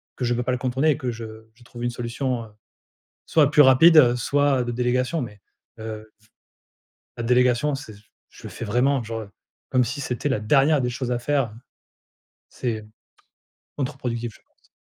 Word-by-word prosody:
que - - -5
je 120 - +1
peux 120 +1 -1
pas 130 - -1
le 125 - 0
contourner 130 +4 +1
et - - -1
que 130 -5 -3
je 110 -1 -9
je 120 - -20
trouve 120 0 -9
une 120 - +1
solution, 120 +1 -3
heu, - - -15 0.8
soit 150 -3 +3
plus 150 0 +7
rapide, 145 +5 +7
heu, 125 -4 +6
soit 140 +1 +1
de 120 - -3
délégation 125 +5 0
mais, 105 -4 -8 0.4
heu, 110 -1 -7
v 110 - -27 0.9
la 120 - -4
délégation 125 +4 +2
c'est 135 -6 -10
j 105 - -18 0.3
je - - -17
le - - -7
fais - - -7
vraiment 125 +5 +1
genre 115 -1 -6 0.4
comme 130 -1 +3
si 145 - -4
c'était 125 +2 -2
la 130 -6 0
dernière 140 +7 +3
des 125 - -1
choses 125 0 -3
à 120 - 0
faire, 140 +2 +1
hein. 110 -2 -10 1.0
C'est, 115 -3 -3
heu, 105 - -15 0.9
contre-productif 125 -4 -3
je - - -19
pense. - - -35
125 Hz, 195 wpm, -23 LUFS, 115-135 Hz, 1.0 s, plus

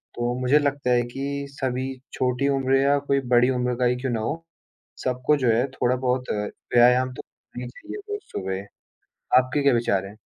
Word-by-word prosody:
तो 120 0 -1
मुझे 130 +4 +4
लगता 140 -3 0
है 120 0 +4
कि 140 +1 -3
सभी 130 -2 -2 0.3
छोटी 125 +2 0
उम्र 135 0 +2
या 140 +1 +3
कोई 140 -1 +1 0.2
बड़ी 125 +2 +5
उम्र 125 0 0
का 125 - +2
ही 125 +1 +3
क्यों 130 -2 -1
ना 115 - -1
हो, 160 +9 -3 0.6
सबको 130 +3 +1
जो 125 -3 +1
है 120 +4 +2 0.2
थोड़ा-बहुत 125 0 +1
व्यायाम 125 +4 +2
तो - - -8 0.3
करना 125 - -6
ही - - -5
चाहिए 320 - -9
रोज़ 415 0 -3
सुबह। 95 0 -3 0.8
आपके 130 +3 0
क्या 140 -1 +4
विचार 100 -5 +1
हैं? 100 +2 -11
125 Hz, 185 wpm, -24 LUFS, 120-140 Hz, 0.8 s, बड़ी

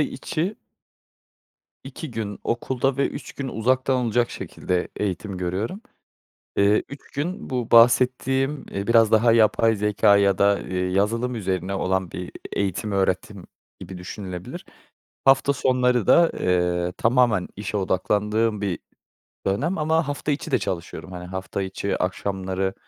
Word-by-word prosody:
içi 160 +7 -2 1.3
2 140 +3 -7
gün 110 -3 -4
okulda 130 +3 -1
ve 140 - +1
3 140 - -8
gün 140 -2 -5
uzaktan 130 +3 +1
olacak 120 +1 +1
şekilde 90 -1 -3
eğitim 100 0 -3
görüyorum. 95 - -3 0.8
Eee, 100 +1 +4
3 140 0 -11
gün 175 +8 -4
bu 125 -3 -2
bahsettiğim, 130 +4 +4
eee, 100 +1 -4
biraz, 115 -2 +5
daha, 115 +1 +5
yapay 115 0 +4
zekâ, 105 0 +4
ya 100 -2 +3
da, 100 0 +4
eee, 90 - -4
yazılım 115 +6 0
üzerine 95 -2 -2
olan 95 -1 -1
bir 90 0 -6 0.2
eğitim, 100 +1 -2
öğretim 95 -1 -1 0.3
gibi 95 -1 -8
düşünülebilir. 90 -1 -7 0.6
Hafta 135 +1 +5
sonları 125 -4 +1
da, 170 -1 +6
eee, 90 -1 +1
tamamen 115 -5 +3
işe 105 +1 -3
odaklandığım 105 +3 0
bir 95 -4 -2 0.7
dönem 140 - 0
ama 160 +1 +1
hafta 145 +1 -2
içi 145 +2 -3
de 130 - +3
çalışıyorum. 90 0 -5
Hani, 90 0 -7
hafta 95 +2 -4
içi 95 +1 -2
akşamları, 95 0 -2
105 Hz, 135 wpm, -24 LUFS, 95-130 Hz, 1.3 s, da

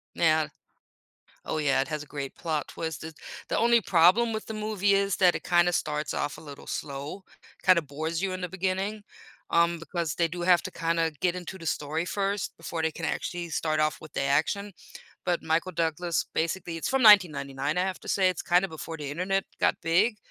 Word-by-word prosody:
Now 155 -2 +3 1.0
Oh 155 - -1
yeah, 140 -3 +2
it 135 - -3
has 155 -2 -3
a 150 - -10
great 140 -2 -5
plot 155 -3 -2
twist, 160 -2 -5
it 160 0 -7 0.4
The - - 0
only 235 0 +5
problem 190 +7 +4
with 220 - -4
the 220 - -5
movie 210 -2 +1
is 195 -1 +1
that 180 -2 +5
it - - -4
kinda 175 0 +3
starts 150 -2 -1
off 145 - -2
a - - -11
little 145 -2 -11
slow, 145 +7 -5 0.4
kinda 185 -3 +5
bores 155 +3 -3
you 195 -1 0
in 185 - -5
the 180 - -3
beginning, 190 +3 -2 0.5
um, 170 0 +3
because 165 -1 -3
they 170 - +2
do 175 +2 -6
have 175 0 +4
to 185 - -5
kinda 165 -1 0
get 180 -1 +2
into 180 +1 -7
the 165 - -6
story 150 +2 -1
first 200 +2 -2
before 165 0 -4
they 160 0 +1
can 165 +1 -5
actually 175 +1 -3
start 155 0 0
off 155 0 +1
with 155 -2 -12
the - - -1
action, 195 +9 0 0.5
but 175 -1 0
Michael 165 +3 0
Douglas, 165 -1 -1
basically, 170 +1 -1
it's 165 - -2
from 265 0 +2
1999, 150 -8 +5
I - - +3
have 190 -1 -3
to - - -12
say, 190 -2 +3
it's 185 - -2
kinda 180 +2 +3
before 160 0 -7
the 145 -2 -5
internet 190 +5 0
got - - +2
big, 190 +8 +2
170 Hz, 205 wpm, -27 LUFS, 155-190 Hz, 1.0 s, only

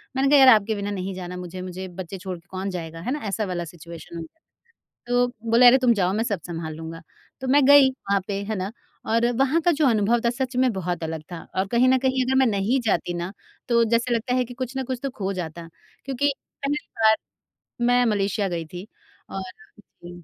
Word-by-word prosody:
मैंने 270 +1 +2
कहा, 290 - +7
यार 265 - +8
आपके 215 +1 0
बिना 200 0 -3
नहीं 195 -1 -4
जाना 180 -1 -6
मुझे 180 +1 -7
मुझे 185 +1 -6
बच्चे 185 +1 -7
छोड़ 185 -1 -6
के 170 - -20
कौन 190 +1 -4
जाएगा 165 -2 -6
है 245 +9 -3
ना? 295 - -1
ऐसा 205 +2 -1
वाला 175 -2 -3
सिचुएशन 170 +1 -11
हो 165 - -5
गया 165 - -12
था। - - -65 0.7
तो 245 0 +3 0.2
बोला 235 +2 +7
अरे 250 +2 +8
तुम 250 -2 +4
जाओ 185 -2 +1
मैं 220 +3 0
सब 205 -6 -2
संभाल 165 -2 -5
लूँगा। 165 +1 -8 0.4
तो 265 - -4
मैं 285 +1 +5
गई 285 -1 +8
वहाँ 200 -6 -1
पे 200 -1 -3
है 215 - -1
ना 190 +3 -3 0.3
और 230 +2 +2
वहाँ 275 +5 +2
का 345 - +3
जो 295 -1 +2
अनुभव 230 0 +3
था 235 - +3
सच 250 +1 -3
में 255 -2 +3
बहुत 180 -3 -3
अलग 160 -1 -4
था, 165 - -7
और 190 - +1
कहीं 250 +2 +5
न 260 0 +5
कहीं 260 0 +1
अगर 265 +1 +1
मैं 265 - +5
नहीं 215 +5 +1
जाती 175 -4 0
ना 175 +2 -4 0.4
तो 235 -1 +4
जैसे 235 +2 +1
लगता 240 +2 -1
है 255 -1 +2
कि 245 - -10
कुछ 255 +1 -5
न 265 - -1
कुछ 255 -1 -3
तो 275 - -2
खो 195 -5 -3
जाता 170 -2 -6 0.4
क्योंकि 275 +2 0 0.3
पहली 290 +2 -1
बार 220 0 +6 0.7
मैं 245 0 +4
मलेशिया 205 -2 0
गई 170 -2 -3
थी, 180 +6 -9 0.4
और 195 - -4 0.6
जी 175 0 -10
205 Hz, 230 wpm, -24 LUFS, 180-255 Hz, 0.7 s, यार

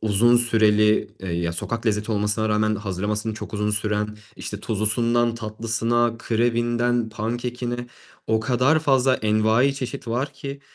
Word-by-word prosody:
uzun 110 +3 +4
süreli, 110 -3 +3
ya 85 -2 -2
sokak 115 +7 -4
lezzeti 105 +1 0
olmasına 105 +1 0
rağmen 110 0 +1
hazırlaması 105 +2 -3
çok 110 - -8
uzun 105 0 0
süren, 105 0 -1 0.2
işte 105 - -6
tuzlusundan 115 +2 +1
tatlısına, 115 +1 -1
krebinden 120 0 0
pankekine 120 +2 -4 0.4
o 110 0 +1
kadar 125 +7 +2
fazla 135 -4 +3
envai 110 +5 +2
çeşit 125 -3 -6
var 130 +5 -2
ki 140 0 -7
115 Hz, 130 wpm, -23 LUFS, 105-120 Hz, 0.4 s, uzun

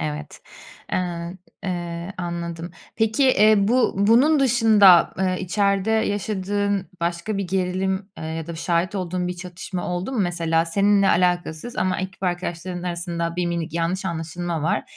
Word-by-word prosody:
Evet, 75 -1 -5 0.5
eee, - - +2
ın 175 0 -4 0.3
eee, 175 0 -4
anladım. 170 -1 -4 0.3
Peki, 225 +4 +2
eee, 215 -4 +5
bu 250 +1 +2
bunun 250 +9 +4
dışında, 220 -8 +6
eee, 185 -1 +1
içeride 200 +2 +1
yaşadığın 205 -2 -1
başka 170 +5 -2
bir 195 - -2
gerilim, 190 +1 -1
eee, - - -6
ya 160 0 -4
da 170 - -6
şahit 170 +3 -1
olduğun 180 -1 -2
bir 180 - -4
çatışma 180 +1 -6
oldu 180 +8 -3
mu? 245 - -2
Mesela 165 -2 +1
seninle 200 +3 +3
alakasız 175 +4 0
ama 185 0 0
ekip 190 0 -7
arkadaşların 175 0 -3
arasında 170 -1 -3
bir 175 -1 0
minik 170 -2 -3
yanlış 170 +3 -1
anlaşılma 170 -1 -3
var 165 - +1
180 Hz, 150 wpm, -23 LUFS, 170-200 Hz, 0.5 s, dışında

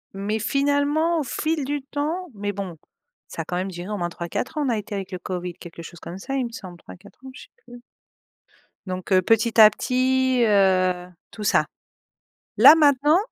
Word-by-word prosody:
mais 210 +3 -2
finalement 285 +7 +1
au - - -1
fil 310 +2 -2
du 290 -1 -3
temps 310 +6 -4
mais 205 0 -3
bon 190 -4 -6 0.5
ça 165 - -6
a - - -20
quand 175 - -3
même 185 +2 -2
duré 180 +2 -8
au 210 - -3
moins 175 -2 -2
3-4 170 - -5
ans 300 - 0
on - - 0
a 230 - 0
été 210 0 -7
avec 195 -1 -6
le 185 - -5
COVID, 180 0 -5
quelque 170 -1 -11
chose 175 +1 -11
comme 175 - -8
ça 270 +8 -6
il 265 -2 0
me - - -12
semble 185 -6 -10
3-4 95 - -15
ans, - - -8
je - - -11
sais - - -19 0.2
plus. 245 0 -12 1.0
Donc 185 +1 -5
heu, 185 - +5
petit 225 +3 +1
à 215 -1 +10
petit, 255 +2 +1
heu, 185 -4 +2 0.2
tout 215 - -9
ça. - - +3 0.9
Là, - - +10
maintenant 295 0 +4
215 Hz, 205 wpm, -23 LUFS, 185-275 Hz, 1.0 s, à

